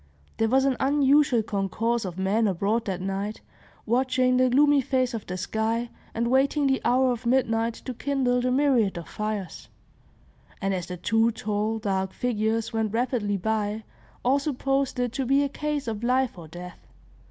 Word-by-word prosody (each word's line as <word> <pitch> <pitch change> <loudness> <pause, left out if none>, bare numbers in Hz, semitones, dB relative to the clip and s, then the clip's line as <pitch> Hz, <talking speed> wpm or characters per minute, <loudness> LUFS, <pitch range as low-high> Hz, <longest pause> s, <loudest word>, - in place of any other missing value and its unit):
There 225 0 +1
was 265 +2 +3
an 270 -2 +1
unusual 275 -3 +3
concourse 220 +3 -1
of 180 -1 -6
men 205 +4 +1
abroad 205 +5 0
that 190 -2 -3
night, 195 +2 -3 0.4
watching 255 +1 +2
the 255 0 +4
gloomy 285 +2 +4
face 255 -1 0
of 225 -3 -5
the 185 - -4
sky, 225 +5 -2 0.2
and 235 +1 0
waiting 275 +2 +2
the 265 -1 +2
hour 255 +1 +3
of 240 0 -4
midnight 230 -2 +1
to 255 - -4
kindle 250 -1 0
the 255 - 0
myriad 250 -8 +2
of 170 - -7
fires; 210 -3 -5 0.9
and 195 0 -1
as 180 -2 -3
the 180 - -6
two 225 +5 +2
tall, 215 0 -2
dark 190 -3 -2
figures 225 -2 -1
went 220 -2 -1
rapidly 230 -4 0
by, 215 +2 -2 0.4
all 270 +3 +4
supposed 275 -2 -1
it 245 -2 0
to 270 -1 -2
be 275 +2 +4
a 280 - -1
case 295 -1 -3
of 220 0 -4
life 255 +1 +1
or 170 -3 -10
death. 175 +2 -10
230 Hz, 175 wpm, -26 LUFS, 210-260 Hz, 0.9 s, the